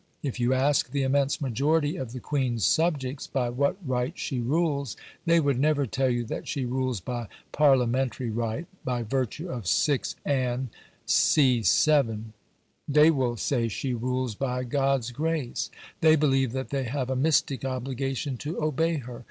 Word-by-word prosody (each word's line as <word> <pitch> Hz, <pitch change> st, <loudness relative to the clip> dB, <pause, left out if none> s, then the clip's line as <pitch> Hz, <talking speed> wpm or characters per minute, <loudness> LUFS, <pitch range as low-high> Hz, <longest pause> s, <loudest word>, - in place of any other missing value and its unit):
If 135 Hz, -3 st, -3 dB
you 120 Hz, +1 st, +2 dB
ask 135 Hz, +2 st, +2 dB
the 140 Hz, -1 st, -1 dB
immense 140 Hz, +1 st, +1 dB
majority 145 Hz, +4 st, +1 dB
of 130 Hz, -4 st, -5 dB
the 130 Hz, -, -6 dB
Queen's 125 Hz, -7 st, -1 dB
subjects 145 Hz, -5 st, 0 dB
by 125 Hz, -3 st, -1 dB
what 140 Hz, +8 st, 0 dB
right 130 Hz, +4 st, -1 dB
she 130 Hz, -4 st, -3 dB
rules, 140 Hz, 0 st, 0 dB, 0.3 s
they 170 Hz, 0 st, +5 dB
would 140 Hz, -5 st, +1 dB
never 145 Hz, 0 st, +2 dB
tell 130 Hz, +2 st, 0 dB
you 120 Hz, -1 st, 0 dB
that -, -, -5 dB
she 135 Hz, -3 st, -2 dB
rules 130 Hz, -2 st, -1 dB
by 120 Hz, +4 st, -5 dB, 0.2 s
Parliamentary 130 Hz, -3 st, +2 dB
right, 115 Hz, +7 st, -2 dB, 0.2 s
by 125 Hz, -2 st, -1 dB
virtue 130 Hz, -, -2 dB
of 120 Hz, -7 st, -5 dB
6 135 Hz, -, +1 dB
Anne, 130 Hz, -3 st, 0 dB, 0.3 s
c. 130 Hz, -6 st, +4 dB
7. 115 Hz, -5 st, +2 dB, 0.5 s
They 150 Hz, +2 st, +6 dB
will 125 Hz, -5 st, 0 dB
say 120 Hz, 0 st, 0 dB
she 125 Hz, +4 st, -3 dB
rules 125 Hz, 0 st, -2 dB
by 125 Hz, +2 st, -2 dB
"God's 135 Hz, -1 st, 0 dB
grace"; 155 Hz, -1 st, -2 dB, 0.3 s
they 160 Hz, 0 st, +6 dB
believe 135 Hz, -5 st, +2 dB
that 130 Hz, +1 st, -4 dB
they 135 Hz, -2 st, -1 dB
have 130 Hz, +1 st, -2 dB
a -, -, 0 dB
mystic 140 Hz, -1 st, +1 dB
obligation 135 Hz, +1 st, -3 dB
to 150 Hz, +7 st, -4 dB
obey 160 Hz, +2 st, +1 dB
her. 125 Hz, -4 st, -6 dB
130 Hz, 160 wpm, -27 LUFS, 125-145 Hz, 0.5 s, They